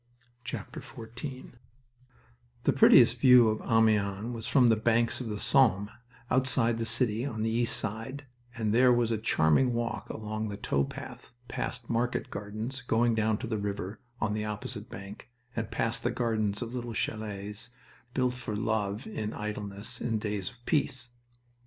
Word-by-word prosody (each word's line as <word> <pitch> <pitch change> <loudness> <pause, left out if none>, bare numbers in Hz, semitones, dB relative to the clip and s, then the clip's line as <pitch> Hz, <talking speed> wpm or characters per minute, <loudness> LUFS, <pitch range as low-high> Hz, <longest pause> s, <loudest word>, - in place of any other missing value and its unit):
XIV 120 +4 -7 1.1
The - - +3
prettiest 125 -2 +7
view 125 -3 +7
of 110 - -1
Amiens 110 -1 +2
was 115 -1 -5
from 125 -3 +5
the 115 - +5
banks 115 +3 +2
of 120 - -4
the 105 - -3
Somme 105 -4 +3 0.4
outside 125 -3 +3
the 115 - -1
city, 115 -2 +2
on 110 -6 -3
the 110 - 0
east 115 +1 +3
side, 115 +7 -4 0.3
and 110 -2 0
there 125 +2 +6
was 120 -1 +2
a 110 - 0
charming 110 - +3
walk 120 0 -3
along 110 0 -4
the 100 -1 -5
tow 70 - 0
path, 70 - -9
past 120 -1 -4
market 120 +1 -1
gardens 110 +6 -4
going 115 +1 +2
down 110 -1 +1
to 120 - -5
the 110 -2 -2
river 100 0 -4 0.2
on 110 -1 0
the 105 0 -2
opposite 105 +2 -4
bank, 100 +4 -9 0.3
and 115 -1 -2
past 115 0 -1
the - - 0
gardens 110 -3 -1
of 120 +1 -7
little 120 -2 -4
chalets 105 -1 -3 0.5
built 125 -1 +2
for 125 -4 -5
love 105 0 -1
in 110 - -4
idleness 105 +2 -4
in 115 -2 0
days 105 -3 -3
of 120 -1 -20
peace. 130 -6 0
115 Hz, 160 wpm, -29 LUFS, 105-120 Hz, 1.1 s, prettiest